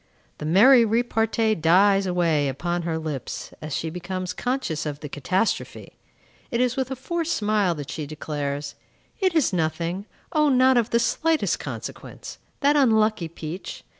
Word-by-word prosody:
The 150 - -4
merry 235 - +7
repartee 225 -1 +1
dies 195 +3 +4
away 165 -5 +1
upon 175 +6 -2
her 165 -1 -2
lips, 155 -5 -5
as 155 -3 -4
she 160 - -3
becomes 180 +1 -4
conscious 245 - -2
of 145 -1 -5
the 150 - -5
catastrophe. 185 +10 -2 0.5
It 235 - -1
is 250 0 +1
with 265 -1 -2
a 265 - -3
forced 335 +5 -2
smile 210 -4 +1
that 145 -2 -7
she 155 -3 -5
declares, 145 -1 -4 0.5
"It 375 -4 +1
is 300 -10 +2
nothing; 170 +4 -2 0.2
O, 300 -1 +3
not 260 0 +5
of 240 -1 +2
the 235 - +2
slightest 315 +7 +1
consequence!" - - -8 0.2
That 290 +1 +4
unlucky 220 - +3
peach! 165 +2 -7
190 Hz, 155 wpm, -24 LUFS, 160-245 Hz, 0.5 s, merry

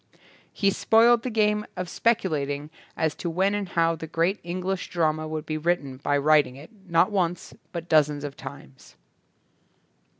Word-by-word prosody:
He 200 -2 +1
spoiled 230 +3 +4
the 255 - -3
game 210 -2 +1
of 180 0 -3
speculating 155 -10 -1 0.3
as 160 -1 +1
to 170 - -4
when 190 +4 +1
and 205 -2 -3
how 165 -1 +2
the 160 0 -7
great 170 +6 0
English 180 +2 -3
drama 155 -2 0
would 155 0 -4
be 155 0 -3
written 150 -5 -1
by 145 +2 0
writing 145 -2 +3
it, 145 - -13 0.2
not 170 +4 +3
once 180 -3 -1 0.2
but 170 -1 -6
dozens 150 -3 +3
of 145 -1 -5
times. 135 0 -12
165 Hz, 160 wpm, -25 LUFS, 150-190 Hz, 0.3 s, spoiled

